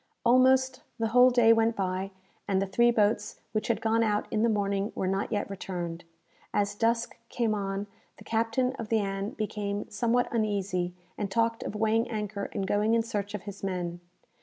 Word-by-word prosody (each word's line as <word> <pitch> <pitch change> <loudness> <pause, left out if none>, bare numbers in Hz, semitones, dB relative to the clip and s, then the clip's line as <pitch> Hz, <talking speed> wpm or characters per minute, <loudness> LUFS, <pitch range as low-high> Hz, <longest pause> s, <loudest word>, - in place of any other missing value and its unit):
Almost 260 +1 +4 0.2
the 225 -1 0
whole 250 +2 +7
day 240 -2 +6
went 225 0 +2
by, 190 -1 -2 0.4
and 195 -2 +2
the 195 - +1
three 235 +5 +3
boats 210 -2 +1
which 215 0 -1
had 225 -2 0
gone 225 0 +2
out 210 -2 +1
in 215 - +1
the 230 - +3
morning 200 -1 0
were - - -1
not 195 +1 -1
yet 205 - -1
returned. 175 -3 -5 0.5
As 205 0 +1
dusk 230 +2 0
came 230 -3 0
on, 200 -1 -2 0.3
the - - -13
captain 230 +3 0
of 225 -2 -5
the 225 - +3
"Ann" 195 -1 -2
became 205 -1 -3
somewhat 240 +3 +1
uneasy, 195 -5 -1 0.2
and 205 -2 -1
talked 230 +2 +1
of - - -5
weighing 220 +2 +1
anchor 210 -2 -3
and 200 -2 -2
going 210 +3 +2
in 230 - +2
search 210 -3 -3
of 210 - -6
his 200 -1 -9
men. 175 -2 -3
210 Hz, 185 wpm, -28 LUFS, 195-230 Hz, 0.5 s, whole